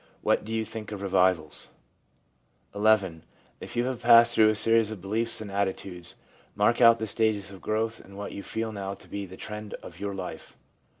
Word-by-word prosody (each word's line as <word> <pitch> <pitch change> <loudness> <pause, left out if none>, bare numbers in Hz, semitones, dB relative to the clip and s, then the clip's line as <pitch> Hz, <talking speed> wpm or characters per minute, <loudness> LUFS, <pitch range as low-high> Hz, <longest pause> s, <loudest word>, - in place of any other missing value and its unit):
What - - +2
do 110 - -8
you 110 0 -1
think 110 -1 -7
of 100 -1 -6
revivals? 90 -5 +1 1.0
'XL 105 +1 0 0.7
If - - -9
you 120 +1 +1
have 130 -2 -3
passed 115 0 +7
through 110 -1 +5
a 110 - +1
series 115 0 +4
of 110 -3 -6
beliefs 110 +5 -2
and 105 -2 -7
attitudes, 95 -3 -3 0.4
mark 105 +4 +2
out 115 -1 +8
the 110 - -3
stages 105 -3 0
of 95 -2 -12
growth 110 +5 -1
and 100 0 -14
what 100 - -5
you 100 - -6
feel 110 +2 -3
now 100 -2 -5
to - - -16
be 100 -1 -5
the 95 +1 -11
trend 105 -1 -7
of - - -12
your 100 -1 -4
life.' 90 -4 -8
105 Hz, 195 wpm, -27 LUFS, 95-115 Hz, 1.0 s, out